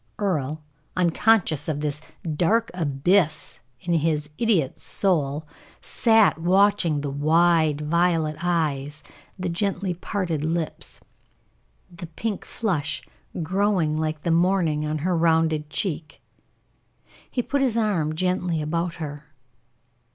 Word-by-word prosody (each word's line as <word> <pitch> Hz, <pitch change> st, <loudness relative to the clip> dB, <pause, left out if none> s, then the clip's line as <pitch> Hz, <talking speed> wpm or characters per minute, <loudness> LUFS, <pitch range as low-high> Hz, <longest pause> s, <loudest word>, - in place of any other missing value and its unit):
Earle, 155 Hz, -6 st, -1 dB, 0.3 s
unconscious 175 Hz, -3 st, +2 dB
of 145 Hz, -1 st, -2 dB
this 150 Hz, 0 st, -2 dB, 0.3 s
dark 215 Hz, +9 st, +2 dB
abyss 155 Hz, +1 st, +1 dB, 0.2 s
in 175 Hz, -, -1 dB
his 155 Hz, -2 st, 0 dB
idol's 190 Hz, -, +1 dB
soul, 155 Hz, -5 st, 0 dB, 0.3 s
sat 220 Hz, -7 st, +3 dB
watching 180 Hz, -3 st, +3 dB
the 140 Hz, -1 st, -3 dB
wide, 155 Hz, +1 st, +3 dB
violet 165 Hz, 0 st, +1 dB
eyes, 155 Hz, -4 st, -1 dB, 0.3 s
the 185 Hz, -1 st, -3 dB
gently 190 Hz, +1 st, -1 dB
parted 175 Hz, -3 st, -3 dB
lips, 160 Hz, 0 st, -3 dB, 0.9 s
the 170 Hz, 0 st, -8 dB
pink 205 Hz, +5 st, -4 dB
flush 165 Hz, -10 st, -2 dB, 0.4 s
growing 185 Hz, -3 st, +1 dB
like 155 Hz, -1 st, -2 dB
the 170 Hz, -, 0 dB
morning 165 Hz, -3 st, +2 dB
on 155 Hz, +1 st, -1 dB
her 180 Hz, -1 st, +2 dB
rounded 160 Hz, -2 st, +2 dB
cheek. 165 Hz, -2 st, -3 dB, 1.1 s
He 245 Hz, -, -1 dB
put 280 Hz, +3 st, -1 dB
his 250 Hz, -4 st, +2 dB
arm 175 Hz, -9 st, 0 dB
gently 180 Hz, -1 st, 0 dB
about 170 Hz, +3 st, -2 dB
her. 150 Hz, -2 st, -7 dB
165 Hz, 115 wpm, -24 LUFS, 150-185 Hz, 1.1 s, sat